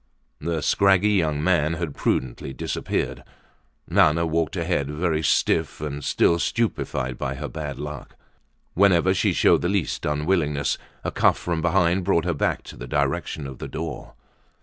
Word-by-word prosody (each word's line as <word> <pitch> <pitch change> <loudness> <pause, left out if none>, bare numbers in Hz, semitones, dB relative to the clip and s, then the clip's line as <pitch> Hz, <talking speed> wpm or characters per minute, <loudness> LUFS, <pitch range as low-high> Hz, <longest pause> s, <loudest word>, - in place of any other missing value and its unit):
The 80 0 -2
scraggy 100 +1 +4
young 80 -7 +1
man 80 -3 +2
had 80 -3 -4
prudently 65 0 -2
disappeared. - - -3 0.6
Nana 85 +3 +3
walked 80 -2 -1
ahead, 70 0 -1
very 80 +1 0
stiff 80 0 +1
and 75 -1 -5
still 85 +5 +2
stupefied 65 - -1
by - - -2
her - - -5
bad 75 -3 -6
luck. 75 0 -7 0.6
Whenever 95 -1 +4
she 95 - +1
showed - - +4
the 85 - 0
lest 100 -5 -1
unwillingness, 75 -1 0 0.2
a - - -2
cuff - - +3
from 85 -2 -2
behind 90 +1 +2
brought 85 -1 +2
her 90 - +1
back 75 - -1
to - - -11
the 60 - -8
direction 70 +1 -1
of 65 -2 -8
the - - -5
door. 80 0 -6
80 Hz, 155 wpm, -24 LUFS, 75-85 Hz, 0.6 s, scraggy